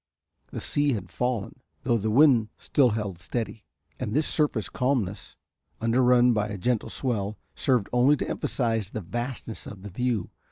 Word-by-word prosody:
The - - -5
sea 145 -1 +1
had 95 -6 -5
fallen, 125 -2 -2 0.2
though 120 -2 +2
the 110 +2 -1
wind 120 -3 +5
still 135 -4 +3
held 100 -5 -4
steady, 110 +3 -4 0.3
and 115 -4 -3
this 155 +1 +3
surface 145 -9 +1
calmness, 125 -7 -1 0.4
under 115 +3 +2
run 125 -1 +5
by 105 -1 0
a 105 -1 -5
gentle 120 +3 0
swell, 110 -5 -2 0.2
served 125 -7 +1
only 130 +4 +5
to - - -3
emphasize 115 -5 -1
the 110 - -5
vastness 120 +4 -5
of 95 -2 -9
the 105 - -8
view. 120 -2 -1
115 Hz, 165 wpm, -26 LUFS, 105-125 Hz, 0.4 s, wind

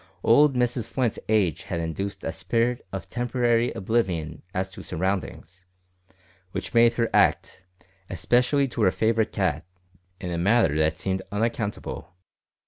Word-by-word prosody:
Old 140 +4 +5
Mrs 125 -2 0
Flint's 125 -5 0
age 100 -8 +2
had 85 - -3
induced 85 +5 -4
a - - -2
spirit 115 +6 -1
of 95 -1 -5
temporary 120 -1 +1
oblivion 90 -8 -1
as 95 -1 -3
to - - -9
surroundings, 90 0 -4 0.9
which - - -5
made 115 0 +5
her 115 0 +1
act, 90 0 +2 0.4
especially 125 - +2
to 120 - -4
her 100 - +5
favourite 110 +1 +1
cat, 85 -6 -1 0.6
in 90 - -5
a 85 - -2
manner 100 -4 +3
that 80 0 +1
seemed 95 0 -2
unaccountable. 105 -5 -3
105 Hz, 135 wpm, -25 LUFS, 90-120 Hz, 0.9 s, Old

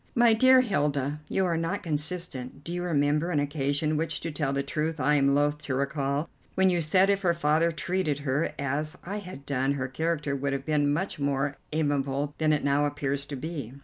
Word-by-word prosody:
"My 235 -2 +6
dear 260 +3 +6
Hilda, 145 - 0
you 190 - +1
are 170 -2 +1
not 165 +5 -2
consistent. 150 -4 -3
Do 170 - -5
you 175 - -2
remember 150 -1 +1
an 155 -5 +1
occasion, 145 +1 0
which 160 +1 -1
to 165 - -3
tell 145 -2 -1
the 140 0 0
truth 155 +2 -2
I 145 +2 +3
am 140 -1 +3
loth 145 +1 +2
to 130 - -1
recall, 140 +2 -1 0.3
when 190 0 +4
you 175 -1 +1
said 185 +5 +4
if 200 0 0
her 170 -3 +2
father 165 +1 +2
treated 165 -2 -1
her 140 +4 +1
as 140 +3 -2
I 200 +4 -4
had 180 -9 -9
done 135 0 0
her 130 -2 -2
character 150 0 -1
would 140 0 -2
be 155 - 0
much 145 +5 0
more 140 0 0 0.2
amiable 145 -2 0
than 155 -1 +3
it 150 - +1
now 140 +1 +2
appears 140 -1 -2
to 140 - -5
be?" 140 -4 -5
150 Hz, 205 wpm, -27 LUFS, 140-170 Hz, 0.3 s, My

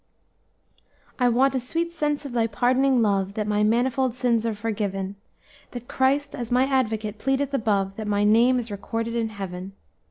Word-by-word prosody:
"'I 250 -1 +4
want 260 +3 +3
a 260 - 0
sweet 330 +7 -2
sense 295 -3 -2
of 275 - -6
Thy 230 -2 +1
pardoning 250 +3 +2
love, 200 -1 0
That 215 - -1
my 210 0 0
manifold 245 +3 +1
sins 235 -3 +1
are 220 - -2
forgiven; 200 -3 -3 0.6
That 245 -1 -7
Christ, 275 +2 +1
as 240 -2 -5
my 250 +1 +3
Advocate, 220 -6 -1
pleadeth 270 +2 0
above, 200 -6 0
That 215 -1 -5
my 205 0 +1
name 230 +5 +4
is 235 -3 -4
recorded 225 +3 -4
in 230 -1 0
heaven. 190 -2 -7
230 Hz, 170 wpm, -24 LUFS, 210-260 Hz, 0.6 s, I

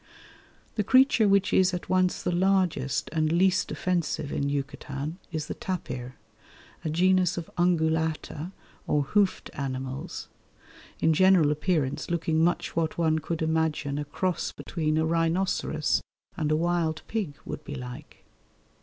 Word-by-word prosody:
The 210 - +2
creature 255 -1 +5
which 200 -1 +3
is 185 -1 +4
at 175 - -6
once 185 -1 +1
the - - 0
largest 180 -7 +1
and 155 -1 +1
least 185 +2 +2
offensive 170 -5 -1
in 140 0 -1
Yucatan 140 +3 -4
is 155 -2 -3
the - - -4
tapir, 130 -9 -5 0.7
a 160 - -1
genus 185 +2 +3
of 170 - -5
Ungulata 160 -1 0 0.4
or 145 -1 +2
hoofed 200 +6 +1
animals, 130 -1 -5 0.7
in 160 - +4
general 185 -3 +5
appearance 150 -3 -1
looking 160 -1 +1
much 175 +1 0
what 160 -1 0
one 160 -2 +2
could 160 +1 -3
imagine 160 -3 0
a 145 - -3
cross 180 +5 -2
between 155 -2 -2
a 160 - +2
rhinoceros 165 -1 +1 0.3
and 155 -4 -1
a - - +4
wild 165 -1 0
pig 200 -10 -3
would - - -6
be 145 - -6
like. 125 -2 -9
160 Hz, 140 wpm, -27 LUFS, 150-180 Hz, 0.7 s, creature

